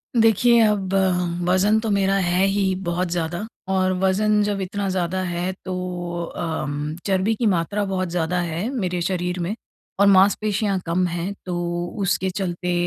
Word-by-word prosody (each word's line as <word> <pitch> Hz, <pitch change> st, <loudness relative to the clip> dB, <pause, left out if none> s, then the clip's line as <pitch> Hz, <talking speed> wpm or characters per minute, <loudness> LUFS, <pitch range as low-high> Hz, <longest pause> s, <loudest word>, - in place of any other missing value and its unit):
देखिए, 230 Hz, +1 st, +5 dB
अब 195 Hz, -3 st, 0 dB, 0.5 s
वज़न 200 Hz, +4 st, +3 dB
तो 220 Hz, -1 st, -3 dB
मेरा 195 Hz, -1 st, +2 dB
है 180 Hz, +2 st, +2 dB
ही 195 Hz, -1 st, +1 dB
बहुत 175 Hz, +1 st, -1 dB
ज़्यादा 175 Hz, +3 st, -2 dB, 0.2 s
और 185 Hz, -1 st, +2 dB
वज़न 210 Hz, +2 st, +3 dB
जब 205 Hz, -1 st, -1 dB
इतना 195 Hz, +1 st, -3 dB
ज़्यादा 185 Hz, 0 st, -1 dB
है 175 Hz, +1 st, -2 dB
तो 180 Hz, -2 st, -4 dB
अम, 150 Hz, -2 st, -3 dB
चर्बी 195 Hz, +2 st, +1 dB
की 230 Hz, -, -1 dB
मात्रा 200 Hz, +2 st, +1 dB
बहुत 185 Hz, -2 st, -2 dB
ज़्यादा 175 Hz, +1 st, -1 dB
है 175 Hz, +6 st, -2 dB
मेरे 180 Hz, -7 st, -2 dB
शरीर 180 Hz, 0 st, -1 dB
में, 180 Hz, +6 st, -2 dB, 0.4 s
और 200 Hz, -, +6 dB
मांसपेशियाँ 200 Hz, +1 st, +3 dB
कम 175 Hz, +2 st, +1 dB
हैं 175 Hz, +3 st, -3 dB
तो 175 Hz, -1 st, -2 dB, 0.2 s
उसके 190 Hz, 0 st, +1 dB
चलते 180 Hz, -2 st, -2 dB
185 Hz, 155 wpm, -22 LUFS, 175-200 Hz, 0.5 s, और